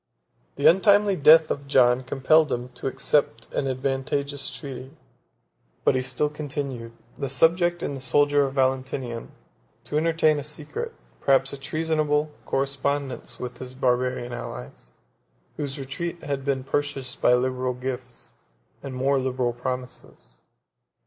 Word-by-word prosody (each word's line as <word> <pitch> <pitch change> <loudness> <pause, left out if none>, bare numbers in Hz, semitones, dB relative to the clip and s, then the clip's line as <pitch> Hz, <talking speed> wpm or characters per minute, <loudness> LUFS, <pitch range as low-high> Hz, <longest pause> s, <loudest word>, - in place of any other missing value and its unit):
The 140 - -3
untimely 200 +4 +5
death 155 0 +7
of 140 0 -3
John 125 -2 +4
compelled 140 +4 +3
him 120 +1 -2
to 125 +1 -6
accept 135 -3 0
an 135 - 0
advantageous 135 +1 -2
treaty; 135 0 -8 0.9
but - - +4
he 130 - +1
still 130 +3 0
continued, 140 -6 -5 0.3
the 140 - -2
subject 175 +5 +3
and 140 - -2
the 135 - -7
soldier 145 +2 +3
of 135 - -7
Valentinian, 130 -3 -1 0.5
to 135 +5 -2
entertain 160 -2 +3
a - - -5
secret, 150 - -5 0.3
perhaps 135 0 +3
a - - -5
treasonable, 155 0 0 0.2
correspondence 140 0 -2
with 125 -1 -6
his 130 0 -8
Barbarian 125 -1 0
allies, 60 - -8 0.7
whose 145 -1 -3
retreat 165 +6 -5
had 140 -2 -3
been 135 -1 -1
purchased 135 -2 -2
by 125 - +6
liberal 130 0 -1
gifts, 125 -1 -6 0.5
and 135 -2 -6
more 135 +2 +2
liberal 130 -2 -1
promises. 125 - -7
135 Hz, 135 wpm, -25 LUFS, 130-145 Hz, 0.9 s, death